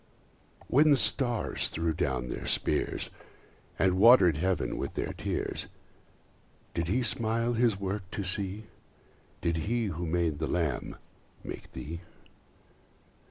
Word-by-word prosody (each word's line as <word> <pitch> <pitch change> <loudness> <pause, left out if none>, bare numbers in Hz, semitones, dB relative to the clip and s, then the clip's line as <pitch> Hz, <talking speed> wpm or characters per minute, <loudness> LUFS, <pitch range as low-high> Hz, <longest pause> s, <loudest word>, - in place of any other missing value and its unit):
When 150 +4 +5
the 145 - +6
stars 120 -4 +1
threw 80 0 -1
down 65 -6 -1
their - - -5
spears, - - 0 0.7
And 95 -1 +2
water'd 110 - +7
heaven 90 +4 -1
with - - -4
their - - -2
tears, - - -3 1.1
Did 85 -1 -1
he 125 +8 +1
smile 115 +1 +1
his 115 -4 +2
work 95 -1 -3
to 100 - -4
see? 95 +2 -1 0.8
Did 85 -1 0
he 115 +9 0
who 85 +2 -4
made 80 -3 0
the 80 - -1
Lamb 80 -6 -1 0.5
make - - -8
thee? 85 +3 -6
95 Hz, 125 wpm, -29 LUFS, 85-115 Hz, 1.1 s, water'd